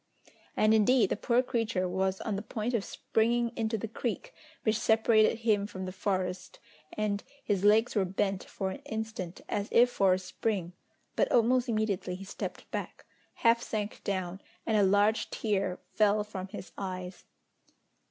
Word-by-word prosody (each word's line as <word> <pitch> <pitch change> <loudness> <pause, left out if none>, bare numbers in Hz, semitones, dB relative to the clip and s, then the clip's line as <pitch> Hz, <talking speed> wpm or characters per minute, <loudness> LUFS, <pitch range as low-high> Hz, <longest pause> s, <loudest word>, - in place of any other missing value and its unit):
And, 215 0 +5
indeed, 220 0 +4
the - - +2
poor 240 +4 +2
creature 225 -7 -1
was 190 +1 -1
on 215 - -2
the 200 - -3
point 220 +2 -3
of 225 -4 +1
springing 235 +3 0
into 225 -1 -1
the 225 - -4
creek - - -4 0.3
which 220 0 +2
separated 220 0 +4
him 210 -3 +2
from 190 -2 -6
the 185 - -4
forest, 185 -1 -2 0.4
and 205 -1 -1 0.2
his 200 -3 0
legs 215 +3 +5
were 200 - +3
bent 195 +1 -1
for 190 -1 -4
an - - -7
instant 220 -5 -5
as 205 +1 -2
if 245 +1 +5
for 195 -5 +4
a - - -2
spring, 185 -1 -3 0.4
but - - +2
almost 245 +2 +3
immediately 210 -5 -1
he 195 +2 -9
stepped - - -6
back, - - -5 0.4
half 230 0 +6
sank 210 -3 -4
down, 190 -1 -3 0.2
and 220 - +1
a 210 - +5
large 205 +3 +3
tear 195 -4 -1 0.2
fell 210 0 +3
from 195 -3 -6
his 190 -1 -9
eyes. 185 -1 -6
210 Hz, 165 wpm, -30 LUFS, 190-225 Hz, 0.4 s, half